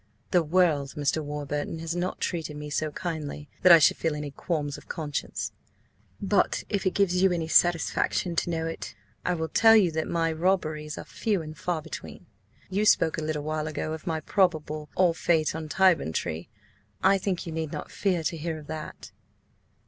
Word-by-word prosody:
"The 180 - +5
world, 155 -4 +2
Mr. 150 +2 0
Warburton, 145 +1 -3
has 165 +1 -4
not 175 +1 -2
treated 160 -4 -3
me 150 0 -7
so 155 +1 0
kindly 150 -3 -5
that 185 - +7
I 170 - +11
should 155 - +4
feel 160 -2 -1
any 150 -1 -5
qualms 145 -1 -2
of - - -13
conscience. 150 -4 -3 0.7
But, 200 0 +1
an 205 - +2
it 185 - 0
gives 185 -2 +2
you 190 -1 +5
any 170 -2 -1
satisfaction 175 +1 +2
to - - +1
know 165 -1 -1
it, 165 - -6 0.3
I 180 - 0
will 160 -1 -2
tell 225 +6 +6
you 190 -6 +5
that 160 0 -2
my 165 -1 0
robberies 155 -3 -1
are - - -5
few 205 -7 -1
and 155 0 -8
far 165 0 -2
between. - - -8 0.4
You 195 +3 0
spoke 165 -6 +3
a - - -4
little 155 -1 -2
while 155 0 -2
ago 155 0 -3
of 160 +1 -8
my 160 -2 -1
probable–ah–fate–on 160 -2 +1
Tyburn 175 - +3
Tree. 80 +6 -3 0.5
I 195 - +5
think 185 -2 -2
you 165 - -5
need 160 -1 -3
not - - -6
fear 180 -5 0
to 165 +1 -1
hear 160 +1 -3
of 155 - -10
that." 155 0 -7
160 Hz, 185 wpm, -27 LUFS, 155-180 Hz, 0.7 s, I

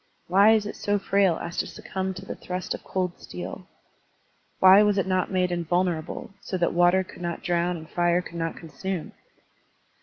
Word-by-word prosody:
Why 200 +5 +6
is 215 -2 +2
it 210 - -5
so 205 0 0
frail 195 -3 +2
as 170 - -6
to - - 0
succtmib 190 0 -4
to 190 +1 -8
the - - -5
thrust 180 0 -4
of - - -8
cold 180 -2 -2
steel? - - -7 0.9
Why 190 +2 +8
was 210 -1 +3
it 195 - +2
not 185 -1 0
made 185 -1 +1
invulnerable, 175 -1 -1
so 185 - -3
that 175 -1 +1
water 175 +2 +4
could 180 - -13
not 170 -1 -4
drown 175 0 0
and 160 -1 -10
fire 175 +1 +1
could 170 - -9
not 165 0 -2
consume? 180 +2 -5
180 Hz, 185 wpm, -26 LUFS, 175-190 Hz, 0.9 s, Why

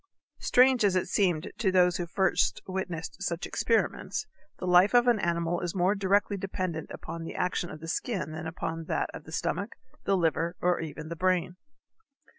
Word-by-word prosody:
Strange 255 -1 +4
as 195 -2 +3
it 185 - +1
seemed 180 -3 +1
to 195 -5 +2
those 180 -1 +4
who 175 - -3
first 190 +3 +1
witnessed 185 -3 -4
such 170 0 -2
experiments, 230 -1 0 0.3
the - - -5
life 180 +5 +5
of 240 0 +6
an 235 -3 +4
animal 170 -1 0
is 175 0 -3
more 185 +2 +3
directly 200 +1 +2
dependent 185 -4 -3
upon 165 0 -7
the 165 - -7
action 180 -1 -1
of 155 - -9
the 165 - -7
skin 175 - -2
than 160 +1 -5
upon 165 0 -4
that - - -1
of - - -9
the 160 - -11
stomach, 170 +6 -2 0.3
the 195 -1 +3
liver, 165 0 0
or 180 0 +2
even 155 -1 -6
the 170 - -4
brain. 180 0 +1
180 Hz, 185 wpm, -29 LUFS, 165-195 Hz, 0.3 s, of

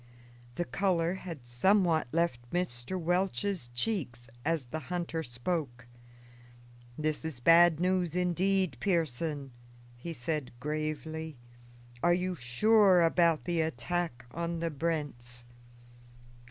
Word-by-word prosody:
The 175 - -1
color 170 +3 +1
had 170 -9 -7
somewhat 165 +6 +3
left 140 -8 0
Mr. 175 -1 -2
Welch's 180 -2 0
cheeks 120 - -2
as 160 -3 0
the 155 +6 -5
hunter 170 -2 -2
spoke. 125 -1 -3 1.1
"This 155 0 -1
is 160 -6 -5
bad 165 +3 +6
news, 180 -2 +1
indeed, 180 -3 +1
Pearson," 150 -3 -1 0.4
he 145 +8 -7
said 150 -1 -3
gravely. 155 +1 -3 0.6
"Are 175 0 +4
you 185 +1 -1
sure 185 - +4
about 165 -1 +3
the 170 -2 +1
attack 160 -4 -2
on 170 +2 -3
the 165 0 -1
Brents?" 140 -6 -3
165 Hz, 110 wpm, -31 LUFS, 135-175 Hz, 1.1 s, bad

